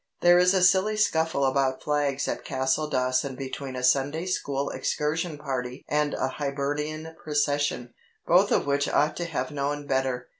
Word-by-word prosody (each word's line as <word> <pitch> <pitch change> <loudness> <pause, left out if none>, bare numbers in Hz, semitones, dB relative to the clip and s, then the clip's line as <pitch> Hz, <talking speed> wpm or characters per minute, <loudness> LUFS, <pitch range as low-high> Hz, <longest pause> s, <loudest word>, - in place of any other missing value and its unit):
There 175 0 +6
is 180 +2 +4
a 185 - +3
silly 190 +4 +4
scuffle 160 -8 +1
about 130 -1 0
flags 145 -2 0
at - - -3
Castledawson 130 -1 0
between 135 0 -6
a 125 - -4
Sunday 140 +6 +2
school 140 -6 -2
excursion 155 +2 -2
party 130 -3 -5
and 150 0 0
a - - 0
Hibernian 150 +3 -3
procession, 145 -4 -1 0.3
both 185 +4 +4
of - - +2
which 140 0 +1
ought 150 +1 +2
to 175 - -2
have 130 -6 -3
known 145 0 -2
better. 130 -2 -1
145 Hz, 155 wpm, -26 LUFS, 135-155 Hz, 0.3 s, There